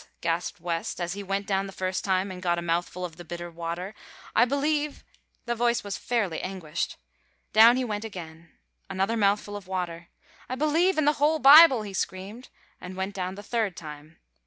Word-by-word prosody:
gasped 170 +1 -2
West, 170 0 -3
as 175 0 -2
he 205 - -6
went 195 +1 -2
down 195 0 0
the - - -8
first 185 -1 -3
time 190 0 0
and 180 -1 -8
got 175 -2 +1
a - - -2
mouthful 175 +2 -1
of 165 -2 -9
the 175 - -9
bitter 175 +1 -7
water, 170 +4 -5 0.4
"I - - +6
believe 290 +2 -1 0.2
" - - -44
The 240 - 0
voice 235 0 +1
was 200 -2 -4
fairly 210 -9 -1
anguished. 185 -5 -4 0.6
Down 230 +3 +8
he 260 - 0
went 210 -2 -3
again. 170 -6 -9 0.4
Another 195 +4 0
mouthful 205 -1 +1
of 200 -2 -8
water. 175 -3 -4 0.4
"I 255 - -2
believe 315 +6 +2
in 310 - +2
the 295 - +4
whole 310 +2 +4
Bible!" 280 -4 +8
he 200 -2 -7
screamed, 195 +6 -5 0.3
and 180 +1 -8
went 190 +1 -3
down 185 -1 -4
the 205 - -9
third 215 -4 -1
time. 150 0 -10
195 Hz, 195 wpm, -27 LUFS, 175-235 Hz, 0.6 s, Down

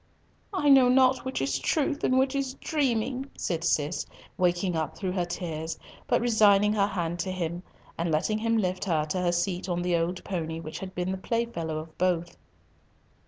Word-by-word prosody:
"I 300 -6 +1
know 265 -3 +7
not 260 0 +4
which 260 - -2
is 135 0 0
truth 285 - 0
and 255 - +3
which 265 +1 +2
is 270 -2 -2
dreaming," 265 -3 -1
said 170 -2 -2
Cis, 155 -1 0 0.3
waking 180 0 +1
up 160 -1 -2
through 190 -2 -2
her 180 -1 0
tears, 165 -2 -4 0.3
but 240 - +3
resigning 210 -3 +4
her 200 -2 +2
hand 175 -3 -3
to 185 +2 -2
him, 175 -1 -3 0.4
and 170 +1 0
letting 165 +8 +1
him 230 +1 +1
lift 185 -3 -1
her 160 -5 +1
to 170 +4 -2
her 175 -1 +2
seat 180 +1 -1
on 175 0 -1
the 175 -1 +1
old 170 +2 -1
pony 165 -3 -3
which 155 -1 -7
had 190 -1 -7
been 180 +1 -1
the 190 - -3
playfellow 190 -8 -2
of 155 +1 -8
both. 175 -2 0
185 Hz, 190 wpm, -27 LUFS, 170-230 Hz, 0.4 s, know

